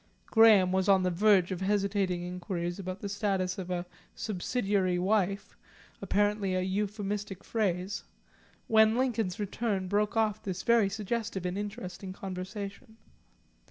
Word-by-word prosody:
Graham 215 -5 +6
was 190 +1 +1
on 190 -1 +5
the 180 - +1
verge 190 0 +4
of 185 0 -3
hesitating 195 -2 0
inquiries 180 0 -4
about 185 0 -5
the 205 - -3
status 195 -2 -1
of 185 -1 -6
a 175 -1 -2 0.3
"subsidiary 195 -2 0
wife," 195 +1 0 0.5
apparently 205 -2 +1
an 185 0 0
euphemistic 205 0 -3
phrase, 195 -3 -1 0.6
when 220 +1 +5
Lincoln's 230 -6 0
return 205 -2 -2
broke 210 +3 0
off 215 -1 +1
this 190 -2 -4
very 230 -4 +4
suggestive 210 -1 -3
and 180 0 -2
interesting 200 -2 -6
conversation. 195 +3 -7
195 Hz, 130 wpm, -30 LUFS, 185-210 Hz, 0.6 s, Graham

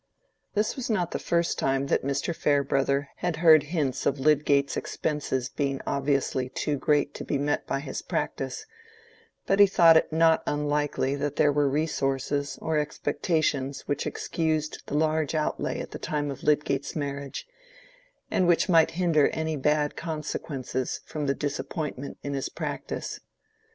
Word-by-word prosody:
This 210 +1 +1
was 260 -3 -4
not 180 -6 0
the - - -2
first 170 0 0
time 135 0 +1
that - - +1
Mr. 140 +5 -1
Farebrother 140 -1 +1
had 175 -2 -1
heard 160 -1 +7
hints 150 -3 -1
of 140 - 0
Lydgate's 140 -1 +3
expenses 140 -4 -2
being 135 0 -2
obviously 135 -2 0
too 150 +3 -1
great 145 +1 +1
to - - -6
be 145 - -1
met 145 +1 -1
by 135 - -1
his - - -5
practice, 435 - -3 0.8
but 195 - +2
he 200 - +9
thought 170 -4 +6
it - - +1
not 160 0 +4
unlikely 145 -2 0
that 145 0 -2
there 145 - +4
were 145 -1 +2
resources 140 -1 -1
or 160 -1 +1
expectations 145 -2 -1
which 145 - -2
excused 155 -2 -2
the - - -3
large 155 0 +1
outlay 155 -1 -1
at - - -6
the - - -7
time 145 -1 -2
of 135 - -8
Lydgate's 145 -2 0
marriage, 140 -2 -4 0.9
and 185 - +2
which 175 -1 +3
might 165 -3 +5
hinder 165 -5 +4
any 160 0 -2
bad 150 +1 +1
consequences 150 -5 -4
from 150 -2 -4
the 140 - +1
disappointment 145 -1 -4
in 140 - -3
his 135 -1 -2
practice. - - -5
145 Hz, 155 wpm, -27 LUFS, 140-160 Hz, 0.9 s, he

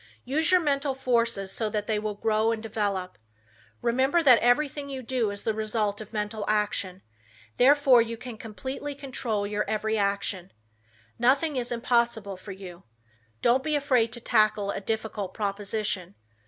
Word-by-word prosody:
Use 300 +6 +1
your 370 0 +6
mental 280 -3 0
forces 230 -6 0
so 220 +1 -1
that 210 -1 -2
they 215 -1 0
will 210 -1 -3
grow 220 +1 +1
and 225 -1 -3
develop. 200 - -2 0.6
Remember 265 +8 +2
that 255 -5 +7
everything 280 +3 +1
you 265 -2 -5
do 240 -3 0
is 200 0 -6
the 220 - 0
result 215 -1 -1
of 215 - -10
mental 210 0 -3
action, 205 -3 -1 0.5
therefore 270 -2 +6
you 230 0 -3
can 245 0 -8
completely 260 +6 -6
control 245 -7 -3
your 210 +1 -1
every 220 0 0
action. 200 -2 -1 0.7
Nothing 275 +6 +3
is 245 -1 -2
impossible 235 -4 0
for 185 +2 -10
you. 185 -2 -10 0.6
Don't 250 +2 +4
be 305 +2 -1
afraid 255 -6 +2
to 240 - -4
tackle 215 -3 +2
a - - -4
difficult 215 -2 -3
proposition. 200 -2 -2
220 Hz, 155 wpm, -27 LUFS, 205-255 Hz, 0.7 s, that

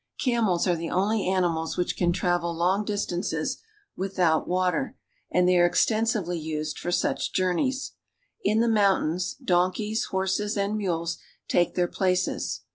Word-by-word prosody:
Camels 220 -9 +1
are 175 - +3
the 165 0 -4
only 200 +2 +1
animals 175 -4 0
which 180 - 0
can 175 -1 +2
travel 175 -1 0
long 185 +5 +1
distances 200 -4 -2 0.4
without 185 -4 +1
water, 185 +8 0 0.3
and 180 0 +3
they 180 -1 +4
are 175 0 +5
exten 220 +4 +2
sively 180 -7 -1
used 155 -1 -4
for 175 - -3
such - - 0
journeys. 200 +9 0 0.5
In 220 +1 +2
the 235 - +2
mountains, 195 -5 +2
donkeys, 190 +5 0
horses, 190 +2 -1
and 200 +1 0
mules 170 -5 -2 0.3
take 175 -1 +1
their 180 -1 +2
places. 185 0 -1
185 Hz, 145 wpm, -26 LUFS, 175-210 Hz, 0.5 s, are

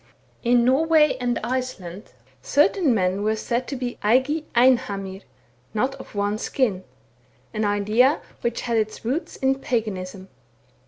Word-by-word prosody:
In 240 0 +3
Norway 305 +4 +4
and 245 -1 0
Iceland 235 -8 -4 0.4
certain 295 - +3
men 190 -3 +1
were 215 +1 +1
said 235 +3 -2
to 280 - -4
be 250 -2 -4
eigi 265 +8 +2
einhamir, 205 -6 +2 0.5
not 255 +5 +1
of 270 - -12
one 205 +1 0
skin, 215 -10 0 0.7
an 215 -1 -1
idea 210 +7 +3 0.2
which 235 0 -1
had 235 -2 0
its 215 0 -2
roots 275 +9 -2
in 270 0 +1
paganism. 195 -6 -3
235 Hz, 130 wpm, -23 LUFS, 205-260 Hz, 0.7 s, Norway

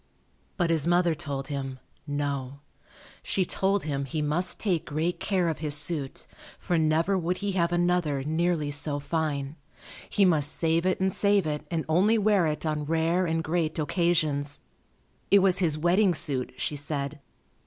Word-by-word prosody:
But 175 -2 +1
his 160 -2 +1
mother 175 -1 +3
told 140 -2 -5
him, 135 -2 -4 0.3
"No." 140 -1 -3 0.6
She 190 - 0
told 195 +2 0
him 140 -2 -2
he 145 +4 -4
must 150 +5 -1
take 180 -7 0
great 160 +4 -2
care 185 -4 0
of 160 - -2
his 150 -2 +1
suit, 145 -2 0 0.3
for 175 - -2
never 160 +5 +2
would 180 +1 -1
he 205 0 -2
have 175 -2 0
another 175 -5 +1
nearly 160 0 0
so 145 0 0
fine; 145 -1 -3 0.5
he 200 - +3
must 155 -5 +3
save 165 +2 +1
it 185 - 0
and 190 0 +1
save 200 -3 +3
it 150 0 -3
and 165 -2 -2
only 190 +8 +3
wear 205 -5 +3
it 155 +1 -3
on 150 -1 -1
rare 165 +3 +1
and 165 0 -1
great 160 -1 -1
occasions. 155 -3 0 0.7
It 200 - +7
was 190 -2 +3
his 160 -5 +2
wedding 175 +3 +3
suit, 130 -4 0
she 150 - -2
said. 145 0 -3
160 Hz, 165 wpm, -27 LUFS, 145-175 Hz, 0.7 s, It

